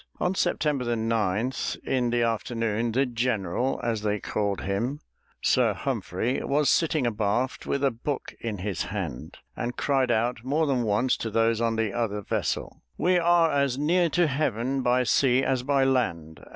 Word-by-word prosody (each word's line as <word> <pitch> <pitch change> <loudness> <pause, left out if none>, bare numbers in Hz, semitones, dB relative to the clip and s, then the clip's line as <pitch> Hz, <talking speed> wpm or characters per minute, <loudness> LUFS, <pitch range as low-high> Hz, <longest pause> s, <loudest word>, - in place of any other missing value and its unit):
On 180 - +1
September 145 -9 0
9, 110 0 0 0.3
in 125 -2 0
the 120 0 +1
afternoon, 115 0 -1
"the 135 +4 +2
general," 120 -1 -1
as 115 -3 -1
they 105 0 -1
called 100 -1 -2
him, 115 +9 -2 0.4
Sir - - +3
Humphrey, 125 +4 -2
was 145 +1 +2
sitting 155 -5 +2
abaft 115 +3 -1
with 140 - -1
a 135 - +3
book 130 +4 -4
in 110 -3 -4
his 95 -1 -3
hand, - - -5 0.2
and 120 +1 -4
cried 135 -3 +1
out 120 +1 0
more 150 +5 +1
than 135 -4 +1
once 115 +3 +1
to 115 - -3
those 115 +1 +1
in 115 -1 +1
the 110 -2 -1
other 105 -4 -2
vessel, - - -3 0.2
"We 180 0 +3
are 170 -1 +4
as 140 -2 +1
near 170 +4 +2
to 175 +3 +2
heaven 135 -3 -1
by 125 0 +2
sea 130 +1 +3
as 130 -2 +1
by 135 +1 +2
land." 85 - -1
120 Hz, 165 wpm, -26 LUFS, 110-135 Hz, 0.4 s, are